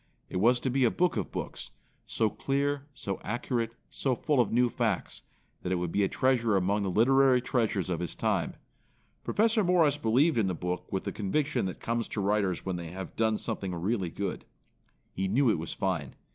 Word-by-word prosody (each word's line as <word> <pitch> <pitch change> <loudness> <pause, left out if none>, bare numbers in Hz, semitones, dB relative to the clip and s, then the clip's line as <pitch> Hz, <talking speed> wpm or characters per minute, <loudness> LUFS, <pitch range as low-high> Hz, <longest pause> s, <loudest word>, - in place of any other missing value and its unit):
It - - -2
was 120 +6 +4
to 130 - 0
be 135 +1 +2
a 120 - +5
book 180 +7 +1
of 105 -5 -2
books, - - -5 0.4
so 110 - +1
clear, 140 +4 -1
so 95 -1 -4
accurate, 115 0 -2
so 130 -3 -1
full 145 +2 +1
of 120 - -1
new 125 +2 +4
f 120 +1 -5
acts 110 -6 -1 0.4
that 90 - -3
it - - +2
would 90 -1 -2
be 100 - +1
a 100 - +3
treasure 120 -4 +2
among 100 +3 +1
the 100 - -1
literary 130 +5 +5
treasures 115 -6 0
of 90 -3 -1
his 90 -2 -4
time. - - 0 0.7
Professor 220 0 +2
Morris 175 -6 +3
believed 125 +5 +3
in 105 - +2
the 90 - -1
book 90 +2 -4
with 95 - -1
the - - -3
conviction 140 +9 0
that 95 - -4
comes 115 0 -1
to - - -4
writers 100 -3 0
when 95 -2 -2
they 85 -1 -6
have 95 0 -7
done 110 -1 +2
something 95 -3 -3
really 95 +1 -1
good. 100 +2 -4 0.7
He 95 +1 -1
knew 120 +5 +3
it 85 - 0
was 80 - -5
fine. 85 -9 -2
110 Hz, 205 wpm, -29 LUFS, 95-130 Hz, 0.7 s, a